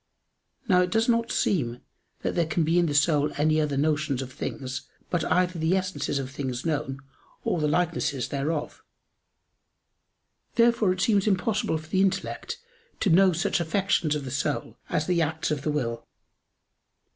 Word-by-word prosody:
Now 180 -4 +5
it 180 - +1
does 225 +4 +2
not 230 -1 +2
seem 125 -10 0 0.4
that - - 0
there 170 -2 +1
can 160 +1 +1
be 165 +3 +3
in 175 - +3
the 145 - -1
soul 150 0 +3
any 155 +1 +3
other 145 -2 -1
notions 150 -2 +1
of 130 0 -10
things 130 -2 -5 0.2
but 175 -2 +1
either 180 -1 +1
the 165 +4 +2
essences 185 -6 -2
of 130 -1 -4
things 130 -2 -4
known 145 -4 -2 0.4
or 175 - 0
the 150 - +2
likenesses 150 -5 0
thereof. 150 +2 -2 1.7
Therefore 230 -4 +4
it 185 0 -2
seems 205 -1 +3
impossible 200 -2 +1
for 155 0 -10
the 190 - +2
intellect 195 0 -1 0.4
to 200 - +2
known 185 +1 +5
such 170 - +1
affections 170 -2 +1
of 145 -2 -4
the 130 - -5
soul 140 +2 -2
as 155 -3 0
the 175 -1 +1
acts 160 0 -1
of 150 -2 -1
the 150 - -2
will. 115 -6 -2
160 Hz, 170 wpm, -26 LUFS, 145-185 Hz, 1.7 s, Now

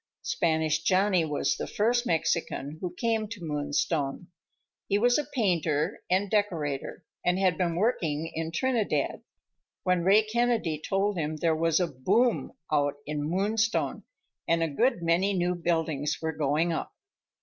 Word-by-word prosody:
Spanish 160 -1 +1
Johnny 185 0 +3
was 150 -2 0
the - - -4
first 240 +3 +1
Mexican 160 -2 -1
who 180 - -3
came 225 +1 0
to 205 -4 -8
Moonstone. 145 +1 -1 0.6
He 200 - +2
was 245 +5 +3
a - - 0
painter 170 - 0
and 190 +3 +2
decorator, 170 -10 -1 0.2
and 180 +1 +2
had 190 -3 +2
been 170 -1 0
working 165 -7 0
in 160 0 -3
Trinidad, 230 +4 0 0.6
when 180 -2 +2
Ray 200 +4 +5
Kennedy 220 -8 0
told 195 0 0
him 155 0 -2
there 160 +1 +1
was 165 +1 +2
a 180 - +2
"boom" 170 - +1 0.2
on 145 -1 +2
in 150 0 -3
Moonstone, 215 +5 0 0.5
and 165 0 +2
a - - +1
good 175 - +1
many 180 +4 +2
new 180 0 +1
buildings 160 -4 -1
were 160 0 -2
going 150 +3 +1
up. - - -4
170 Hz, 150 wpm, -28 LUFS, 155-205 Hz, 0.6 s, Ray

